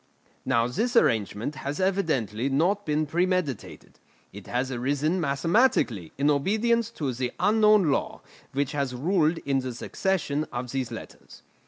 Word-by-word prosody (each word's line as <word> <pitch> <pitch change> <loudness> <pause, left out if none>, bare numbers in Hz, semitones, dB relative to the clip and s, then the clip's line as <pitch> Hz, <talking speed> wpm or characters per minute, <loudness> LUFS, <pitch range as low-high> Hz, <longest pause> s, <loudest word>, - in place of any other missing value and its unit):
Now 115 -3 +2
this 225 - -1
arrangement 110 - +2
has 140 +4 -4
evidently 140 - 0
not 175 +9 +1
been 155 +1 +1
premeditated; 175 - -2 0.3
it 100 -1 -11
has 125 +2 -1
arisen 145 +8 0
mathematically 140 - +1
in 145 +2 +3
obedience 220 +10 +1
to 140 -5 -2
the 125 0 -2
unknown 210 -5 +4
law - - -2 0.3
which 140 0 -1
has 140 -4 -2
ruled 165 +3 +1
in 135 -1 +1
the 130 -2 -5
succession 155 - -1
of 120 0 -4
these 130 -3 -2
letters. 115 - -11
145 Hz, 140 wpm, -26 LUFS, 130-185 Hz, 0.3 s, unknown